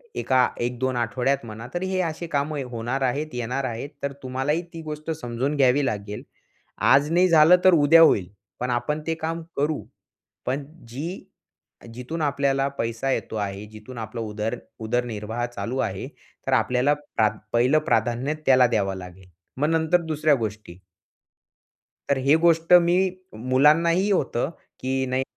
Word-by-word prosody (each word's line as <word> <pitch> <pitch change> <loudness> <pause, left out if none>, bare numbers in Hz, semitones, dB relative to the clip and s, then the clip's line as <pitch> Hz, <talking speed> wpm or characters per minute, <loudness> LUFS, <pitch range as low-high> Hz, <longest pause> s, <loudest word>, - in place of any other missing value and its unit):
एका 130 - +3
1-2 125 +1 -1
आठवड्यात, 125 +2 0
म्हणा 110 +2 -8
तर 175 - -2
हे 190 0 -1
असे 165 0 -3
काम 145 +2 0 0.2
होणार 120 +4 -3
आहेत, 140 +4 0
येणार 125 +3 -2
आहेत. 120 +3 -4
तर 140 0 -2
तुम्हालाही 135 +5 -1
ती 165 - -7
गोष्ट 155 +1 -5
समजून 135 -1 -3
घ्यावी 135 +1 +3
लागेल. 105 -1 -4 0.5
आज 145 +3 +4
नाही 180 +2 +4
झालं 165 +2 +7
तर 185 - +7
उद्या 165 +1 +6
होईल. 100 - +5 0.3
पण 125 - -2
आपण 135 +6 -1
ते 165 - 0
काम 165 +1 -4 0.2
करू, 150 +2 0 0.6
पण 135 +2 -1 0.2
जी 155 +10 -6 0.7
जिथून 140 +7 -5
आपल्याला 140 -1 +1
पैसा 115 +3 -2
येतो 110 - -3
आहे 100 -1 -4
जिथून 110 +4 -12
आपला 110 +1 -5
उदर 105 0 -3 0.2
उदरनिर्वाह 115 0 -2
चालू 120 +1 -5
आहे. 95 -3 -2 0.4
तर - - +1
आपल्याला 125 +4 +2 0.2
प्रा 110 -1 +4 0.2
पहिलं 125 +6 +4
प्राधान्य 130 -1 0
त्याला 130 -2 +6
द्यावं 100 -4 0
लागेल. 90 0 -11 0.3
मग 150 +3 +1
नंतर 165 +2 +2
दुसऱ्या 155 -2 +2
गोष्टी. 105 -6 -5 1.3
तर 140 - +2
ही 140 +3 +5
गोष्ट 165 0 +2
मी 170 0 +2 0.6
मुलांनाही 165 +8 +4
होतं, 140 -7 0 0.3
की 130 0 -1
"नाही 130 +1 0
130 Hz, 150 wpm, -24 LUFS, 115-155 Hz, 1.3 s, झालं